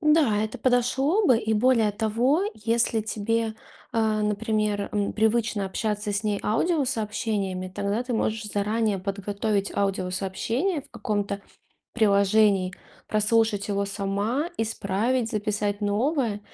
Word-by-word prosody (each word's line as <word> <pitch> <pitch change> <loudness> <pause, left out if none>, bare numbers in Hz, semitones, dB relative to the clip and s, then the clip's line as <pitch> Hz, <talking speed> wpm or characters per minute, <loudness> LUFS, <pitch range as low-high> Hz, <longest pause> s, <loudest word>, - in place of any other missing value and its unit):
Да, 300 -8 +4
это 220 - -4
подошло 265 - +2
бы. 250 -4 +5
И 220 -1 -1
более 225 -1 +3
того, 230 - +1
если 230 +1 +1
тебе, 220 +1 -1 0.4
э, 220 -2 +1
например, 210 0 0
м, 205 -1 0
привычно 220 -2 +1
общаться 210 +1 -2
с 205 +2 -2
ней 205 -1 0
аудиосообщениями, 215 - -1
тогда 200 +4 -2
ты 250 0 -4
можешь 220 0 -1
заранее 210 0 0
подготовить 200 +1 -2
аудиосообщение 200 - -1
в - - -23
каком-то 205 -3 -2 0.5
приложении, 200 -3 +3 0.3
прослушать 215 -1 +1
его 200 0 0
сама, 200 - -1
исправить, 225 +2 0
записать 205 -1 -1
новое. 220 +2 0
215 Hz, 115 wpm, -25 LUFS, 200-230 Hz, 0.5 s, бы